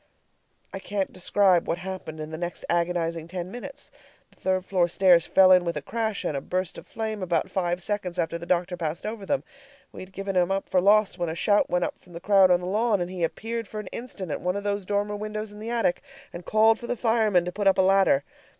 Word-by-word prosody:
I 195 - -4
can't 195 0 -3
describe 185 -1 +2
what 170 - 0
happened 180 -4 -7
in 155 0 -6
the 160 - -5
next 175 0 -5
agonizing 170 -1 -1
ten 180 +1 -6
minutes. 275 +4 -9 0.4
The - - -26
third 185 -1 0
floor 180 -3 +2
stairs 175 -1 +4
fell 190 -1 +6
in 180 -1 +6
with 170 -1 -2
a - - -3
crash 220 -3 -3
and 150 - -1
a 135 - -2
burst 185 +3 -3
of - - -16
flame 220 -2 -4
about 175 -3 -1
five 175 -1 -1
seconds 190 -4 -3
after 170 -1 -1
the 170 - -9
doctor 180 0 0
passed 165 -1 -4
over 215 -2 -5
them. 280 - 0 0.5
We - - -11
had 185 - -10
given 195 0 -4
him 180 0 +3
up 195 0 -2
for 185 - +3
lost 205 0 +3
when 175 -1 -1
a 160 - -4
shout 205 +4 +2
went 180 0 +1
up - - -6
from 180 - -19
the 170 - -7
crowd 195 0 +5
on 180 0 +4
the - - -5
lawn, 210 +2 +1
and 175 0 -3
he 180 -2 -4
appeared 230 +6 -3
for 215 - -6
an 210 - -7
instant 210 -8 -6
at - - -3
one 180 +1 -1
of 200 - -3
those 200 -2 -2
dormer 205 0 -1
windows 215 0 -5
in 210 - -12
the 220 +2 -6
attic, 230 -7 0 0.3
and 175 0 -8
called 220 +1 +4
for 240 - -8
the 245 - -2
firemen 220 -6 +2
to 180 - -3
put 205 +2 -1
up 195 - +4
a - - +5
ladder. 190 -7 +4
190 Hz, 250 wpm, -26 LUFS, 175-210 Hz, 0.5 s, fell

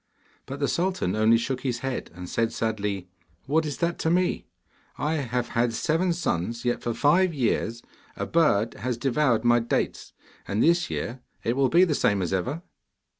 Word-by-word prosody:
But 135 +2 -6
the 140 - +1
sultan 175 - 0
only 110 +2 +5
shook 125 +2 -2
his 125 -3 -2
head, 135 -1 -3
and 90 0 -7
said 115 +5 0
sadly, 105 -4 -2 0.4
'What 155 +3 +1
is 145 - -4
that 170 0 -1
to 160 - 0
me? 180 +2 +1 0.5
I 155 +2 0
have 125 -3 -2
had 115 0 0
seven 170 +7 +1
sons, 115 - -2
yet 120 - 0
for 120 -1 -2
five 170 +7 +3
years 115 -3 -1 0.3
a - - -3
bird 120 -10 +2
has 125 -1 -3
devoured 125 -2 +1
my 120 0 +5
dates; 115 - -2 0.3
and 100 +2 +1
this 170 +1 +3
year 120 +2 -4 0.2
it 115 - 0
will 135 -1 +3
be 175 +2 +5
the 170 -5 +2
same 100 -8 +2
as 90 - -2
ever. 130 - -2
125 Hz, 180 wpm, -26 LUFS, 115-160 Hz, 0.5 s, only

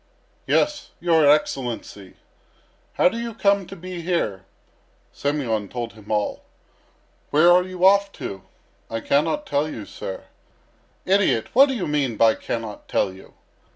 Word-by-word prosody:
"Yes, 300 0 +1
your 165 -4 +4
Excellency." 120 -9 -1 0.8
"How - - +4
do 225 +6 -1
you 235 -2 -5
come 200 -3 +2
to 195 - -9
be 180 -1 -7
here?" 135 - -2 0.7
Semyon 125 -8 -1
told 120 -2 -5
him 105 -1 -12
all. 105 -1 -1 0.9
"Where 155 +4 +5
are 180 +1 +6
you 185 0 -1
off 200 +1 +5
to?" 95 -1 -7 0.5
"I 115 - -3
cannot 160 - 0
tell 150 - 0
you, 110 -8 -7
sir." 95 - -7 0.8
"Idiot! 190 - +2
What 270 +4 +7
do 265 - -2
you 200 - -2
mean 140 -6 -1
by 115 0 +5
'cannot 110 -2 -6
tell 95 - 0
you?'" 95 - -16
150 Hz, 145 wpm, -23 LUFS, 115-185 Hz, 0.9 s, What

